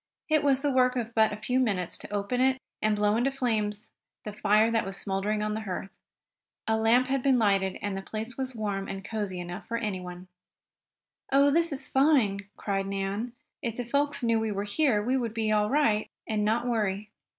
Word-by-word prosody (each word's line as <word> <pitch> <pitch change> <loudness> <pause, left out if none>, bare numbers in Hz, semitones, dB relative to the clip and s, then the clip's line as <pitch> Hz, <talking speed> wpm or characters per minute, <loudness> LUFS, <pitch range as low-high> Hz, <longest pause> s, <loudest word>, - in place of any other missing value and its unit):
It 310 -1 +3
was 275 -1 +2
the 290 - +2
work 255 -1 +3
of 235 -2 -3
but 220 -1 +4
a 210 - -4
few 250 +4 0
minutes 195 -8 0
to - - -9
open 205 +5 -1
it, 260 0 +3 0.2
and 215 0 +2
blow 210 0 +2
into 245 +3 +2
flames 215 -5 -2 0.3
the 210 - -6
fire 215 +2 +3
that 225 -1 +2
was 195 0 -4
smouldering 205 +2 -1
on 210 0 -1
the 220 - -3
hearth. 195 -1 -5 0.8
A 220 - +2
lamp 225 +3 +4
had 270 0 0
been 265 -1 +3
lighted 195 -4 +2
and 205 -1 -2
the 195 - -4
place 220 +4 -6
was 260 -1 -4
warm 200 -3 -2
and 195 0 -6
cozy 205 -4 -3
enough 175 0 -7
for 230 - -1
anyone. 185 -5 -5 1.0
"Oh, 280 +1 +5
this 335 +2 +3
is 275 - -3
fine!" 250 -9 +2
cried 195 -1 -2
Nan. 195 +4 -3 0.3
"If 235 -5 -3
the 245 - -3
folks 280 +2 0
knew 230 -1 +3
we 220 -1 -1
were 200 0 -2
here 210 0 +1
we 255 +4 +1
would 235 -3 -3
be 220 -1 0
all 210 0 +2
right, 240 -7 +2 0.2
and 215 -1 -1
not 225 +3 +1
worry." 210 -3 -1
220 Hz, 205 wpm, -28 LUFS, 205-250 Hz, 1.0 s, Oh